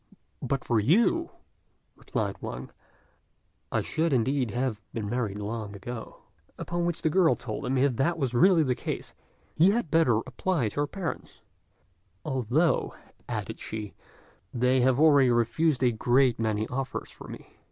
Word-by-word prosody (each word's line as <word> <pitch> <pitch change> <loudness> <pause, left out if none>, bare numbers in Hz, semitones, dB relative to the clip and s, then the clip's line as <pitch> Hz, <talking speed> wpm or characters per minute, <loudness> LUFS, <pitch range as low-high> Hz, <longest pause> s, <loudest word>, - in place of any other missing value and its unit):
"But 135 -1 -2
for 115 -3 +2
you," 230 - +3 0.7
replied - - -3
Wang, - - -6 1.0
"I - - +1
should, 160 -1 -1
indeed, 130 +1 +1
have 120 -1 -2
been 110 -3 -3
married 110 -3 -2
long 105 0 -5
ago." 115 +4 -8 0.3
Upon 175 0 -2
which 175 - -3
the 160 - +3
girl 180 -1 +4
told 120 +2 -5
him 130 +1 0
if 130 -2 +2
that 165 +6 +1
was 135 -6 -1
really 170 +6 +5
the 130 -3 +1
case, - - -5 0.4
he 170 +5 +5
had 205 -6 0
better 160 -9 +4
apply 130 -1 -1
to 145 - -5
her 145 - +1
parents, 180 0 -6 0.8
"although," 135 +4 +1 0.3
added - - -4
she, 105 -2 -6 0.6
"they 125 +1 +2
have 130 +1 +3
already 145 -4 +6
refused 125 +5 +1
a 125 - +4
great 120 +2 +2
many 110 -1 0
offers 130 +1 -4
for - - -12
me. - - -12
130 Hz, 150 wpm, -27 LUFS, 115-160 Hz, 1.0 s, already